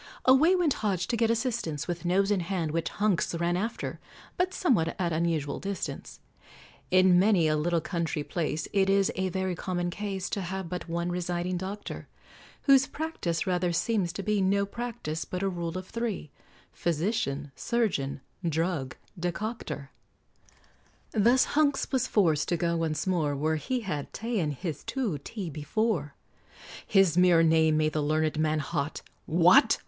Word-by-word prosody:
Away 290 +8 +6
went 345 -6 +2
Hodge 190 -4 0
to - - +1
get 230 0 +2
assistance, 230 - -1
With 175 0 -4
nose 195 +3 +2
in 205 - +2
hand, 170 -3 -2
which 165 +1 -1
Hunks 200 -5 0
ran 170 +1 0
after, 220 +6 -3 0.4
But 365 +1 +1
somewhat 220 - +1
at 175 -3 0
unusual 160 -3 -1
distance. 200 0 -5 0.7
In 185 -1 +5
many 190 -4 +4
a 155 - +2
little 165 +2 +1
country 165 -3 -2
place 160 -1 -2
It 195 -1 +3
is 195 0 +3
a 190 0 0
very 190 0 -1
common 175 0 -2
case 195 -1 -3
To 200 - -1
have 190 0 -4
but 180 -2 -5
one 170 +1 -1
residing 180 0 -2
doctor, 195 +3 -6 0.6
Whose 275 -1 +5
practice 295 - -3
rather 180 -1 +1
seems 185 0 0
to 195 - -5
be 210 -1 +1
No 200 +1 +2
practice, 200 -8 -4
but 185 +1 -4
a - - +2
rule 170 -1 -4
of 185 - -6
three, 225 - -3 0.4
Physician 155 -5 -1
surgeon 200 - -1 0.2
drug 160 -5 -1 0.2
decoctor; 175 -5 -4 1.2
Thus 235 +4 +4
Hunks 290 -2 +1
was 260 -2 +1
forced 160 -8 +2
to 175 - +1
go 170 +1 0
once 160 -2 -1
more 165 -6 +1
Where 155 +3 0
he 245 - -2
had 150 -9 -4
ta'en 225 -9 -1
his 150 +3 -5
to 225 - -2
t' 185 - -6
before. 150 0 -1 0.7
His 190 -4 +4
mere 175 -2 +6
name 160 -1 +4
made 155 0 +1
the 155 - 0
learned 155 +1 0
man 155 0 +2
hot, 145 0 -3 0.2
"What! 175 - +6
180 Hz, 160 wpm, -28 LUFS, 160-205 Hz, 1.2 s, Away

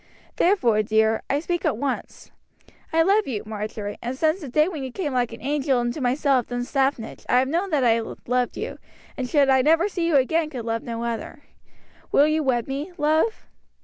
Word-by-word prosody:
Therefore, 250 - +3
dear, 220 +1 +2
I 280 - +1
speak 345 +2 -2
at - - 0
once. 275 +2 -4 0.6
I 325 0 +4
love 400 +4 +3
you, 225 -6 -3
Marjory, 210 -1 -5
and 245 +2 -4
since 315 +5 +1
the 295 - -6
day 305 +5 +3
when 330 -6 -5
you 260 -1 -5
came 300 -2 -3
like 245 -2 0
an - - -10
angel 280 -2 +1
into 240 +4 -2
my 250 0 +2
cell 280 -3 +2
at 240 - -6
Dunstaffnage 250 0 -2
I 250 - +4
have 260 +1 +3
known 345 +7 -1
that 295 -6 +1
I 230 -1 +4
loved 245 +2 -2
you, - - -5 0.4
and 255 -2 -4
should 285 -1 +4
I 265 -1 +4
never 325 +7 +3
see 350 -4 -2
you 330 - +2
again 305 +4 +2
could 250 -6 -6
love 230 0 -1
none 230 -1 -5
other. 235 +5 -5 0.7
Will 285 - +5
you 310 +1 +1
wed 250 -5 0
me, 280 +6 -4
love?" 315 +8 +1
270 Hz, 210 wpm, -24 LUFS, 240-310 Hz, 0.7 s, Will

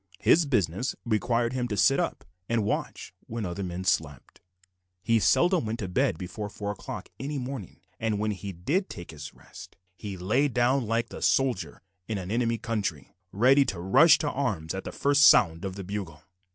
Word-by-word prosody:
His 160 - +4
business 105 - 0
required 115 +1 0
him 125 -1 -1
to 105 -3 -3
sit - - +4
up - - -3 0.2
and 115 -2 +1
watch 100 - -3
when 115 -1 -4
other 90 +2 -4
men 90 -1 -4
slept. 75 -7 -2 0.6
He 115 +2 +3
seldom 175 - +3
went 110 +1 -2
to 100 - -4
bed 110 - +1
before 95 +4 -6
four 100 0 -4
o'clock 105 - -8
any 145 +2 -4
morning, 125 -6 -6 0.2
and 110 -2 -1
when 105 +1 -1
he 100 0 -6
did 145 - -1
take 85 - -8
his 75 -1 -9
rest - - -13 0.2
he 100 0 -7
lay 110 +11 +1
down 125 -1 +1
like 115 +1 0
the - - -9
soldier 110 - 0 0.2
in 110 - -2
an 95 0 -6
enemy's 115 0 0
country, 100 - -3 0.2
ready 130 +7 +5
to 95 - -4
rush 135 - +6
to 145 - -2
arms 100 - -2
at 95 - -5
the - - -5
first 145 +1 +2
sound 85 - +6
of 95 -1 -4
the 100 - -6
bugle. 90 -5 -6
105 Hz, 190 wpm, -27 LUFS, 95-125 Hz, 0.6 s, rush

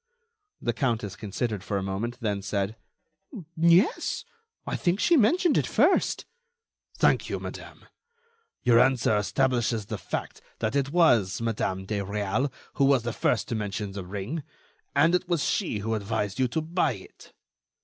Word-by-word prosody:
The 120 - -1
countess 115 -5 -1
considered 105 -1 -3
for 100 - -2
a 95 - -2
moment, 105 +6 -3
then 105 -3 -1
said: 100 +1 -2 0.8
"Yes, 170 - +3 0.4
I - - -2
think 180 +3 0
she 345 - +4
mentioned 320 - +4
it - - -1
first—" - - +2 0.7
"Thank - - +3
you, - - -1
madame. - - -9 0.8
Your 120 -2 +5
answer 125 -4 +3
establishes 120 0 +1
the - - -5
fact - - -5 0.2
that 110 +3 -2
it 140 -1 +1
was 120 - +3
Madame 100 -4 -2
de 105 +1 -2
Réal 105 +6 -1 0.3
who - - +7
was 135 -3 +4
the 120 -1 -3
first - - 0
to - - -1
mention 105 -2 -3
the 100 -1 -6
ring, 100 - -4 0.5
and 165 +5 +4
it 180 0 +1
was 170 -5 +1
she 180 - 0
who 115 - 0
advised 105 0 -2
you 130 - +3
to 160 +7 -2
buy 165 -3 0
it." 95 -4 -14
115 Hz, 160 wpm, -27 LUFS, 100-140 Hz, 0.8 s, who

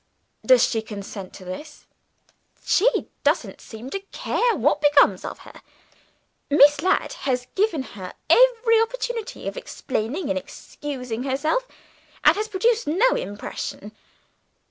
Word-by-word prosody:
"Does - - +6
she 225 - -1
consent 200 -3 -8
to 185 - -12
this?" 295 +12 -9 0.8
"She 440 +7 +4 0.3
doesn't - - 0
seem 235 +4 -10
to 395 - -2
care 455 +4 -1
what 295 +2 +1
becomes 285 -10 +4
of - - -6
her. - - -14 0.9
Miss 290 0 +6
Ladd 370 - +1 0.2
has 250 -1 0
given 390 -8 +1
her 190 -7 -9
every 470 -2 +5
opportunity 480 -1 -3
of - - -4
explaining 295 - -3
and 285 - 0
excusing 250 -5 -7
herself, 295 - -1 0.6
and - - +6
has 425 +1 -2
produced 445 +2 +1
no 380 +12 +3
impression. 205 - -5
295 Hz, 125 wpm, -23 LUFS, -, 0.9 s, Does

